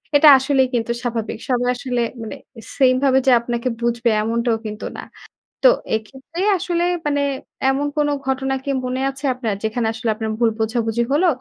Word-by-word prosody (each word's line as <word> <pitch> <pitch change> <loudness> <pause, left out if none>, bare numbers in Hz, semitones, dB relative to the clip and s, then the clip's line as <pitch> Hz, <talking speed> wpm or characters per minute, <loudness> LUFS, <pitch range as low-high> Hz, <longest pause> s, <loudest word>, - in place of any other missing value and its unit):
এটা 290 +2 +7
আসলেই 265 0 +2
কিন্তু 235 0 0
স্বাভাবিক। 230 -4 -3
সবাই 245 -1 +1
আসলে 245 -1 -2 0.2
মানে 220 - -6 0.4
সেইম 255 -2 +5
ভাবে 265 -1 +4
যে - - +7
আপনাকে 235 +1 -3
বুঝবে 235 0 +1
এমনটাও 230 +1 0
কিন্তু 215 0 -5
না। - - -6 0.6
তো - - +10 0.3
এক্ষেত্রে 265 - -6 0.2
আসলে 345 -1 -1 0.2
মানে 285 -1 +1 0.5
এমন 275 +2 0
কোন 295 - +2 0.2
ঘটনা 265 0 0
কি 280 - -5 0.2
মনে 255 +1 -2
আছে 270 +1 -7
আপনার? 230 -5 -3
যেখানে 220 +1 -1
আসলে 225 0 -3
আপনার 220 0 -3
ভুল 235 -2 +4
বোঝাবুঝি 225 +1 0
হলো? 325 +6 +3
245 Hz, 170 wpm, -20 LUFS, 230-270 Hz, 0.6 s, তো